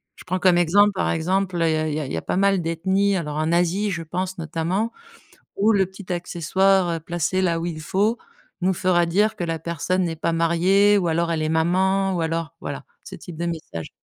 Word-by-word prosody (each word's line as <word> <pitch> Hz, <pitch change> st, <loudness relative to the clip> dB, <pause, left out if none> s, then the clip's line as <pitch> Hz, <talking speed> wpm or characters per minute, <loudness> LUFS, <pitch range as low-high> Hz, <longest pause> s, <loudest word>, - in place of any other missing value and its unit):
Je -, -, -14 dB
prends 185 Hz, +1 st, -2 dB
comme 180 Hz, -2 st, +4 dB
exemple, 200 Hz, +5 st, +4 dB
par 190 Hz, -, -1 dB
exemple, 185 Hz, +2 st, 0 dB
il 165 Hz, -1 st, +3 dB
y -, -, +1 dB
a 155 Hz, 0 st, -1 dB
il -, -, -3 dB
y -, -, -1 dB
a 150 Hz, -, -3 dB
il -, -, -6 dB
y -, -, -1 dB
a -, -, -3 dB
pas -, -, -2 dB
mal 195 Hz, -1 st, +3 dB
d'ethnies, 190 Hz, +4 st, +1 dB
alors 150 Hz, -3 st, -4 dB
en 155 Hz, +1 st, 0 dB
Asie 180 Hz, +4 st, +1 dB
je 170 Hz, -1 st, -3 dB
pense 185 Hz, +3 st, -4 dB
notamment, 170 Hz, +7 st, -2 dB, 0.6 s
où 215 Hz, +3 st, +3 dB
le 195 Hz, -2 st, +3 dB
petit 190 Hz, 0 st, -10 dB
accessoire, 180 Hz, +2 st, +1 dB
heu, -, -, -6 dB
placé 175 Hz, +3 st, -1 dB
là 170 Hz, -3 st, +1 dB
où 170 Hz, -, -3 dB
il 160 Hz, -3 st, -4 dB
faut 205 Hz, +8 st, 0 dB, 0.4 s
nous 185 Hz, +1 st, +2 dB
fera 175 Hz, -1 st, +2 dB
dire 205 Hz, +6 st, +1 dB
que 175 Hz, -, -4 dB
la 165 Hz, -1 st, -2 dB
personne 170 Hz, +3 st, -1 dB
n'est 165 Hz, -2 st, -2 dB
pas 165 Hz, +1 st, -1 dB
mariée 180 Hz, +5 st, +3 dB
ou 180 Hz, -4 st, 0 dB
alors 170 Hz, +1 st, 0 dB
elle 155 Hz, -1 st, -1 dB
est 155 Hz, -, -1 dB
maman 190 Hz, +4 st, +1 dB
ou 170 Hz, -, -1 dB
alors 165 Hz, -2 st, -3 dB
voilà -, -, -6 dB, 0.2 s
ce -, -, -11 dB
type 170 Hz, -3 st, -10 dB
de 170 Hz, -, -2 dB
message. 155 Hz, -, -5 dB
175 Hz, 235 wpm, -23 LUFS, 165-190 Hz, 0.6 s, comme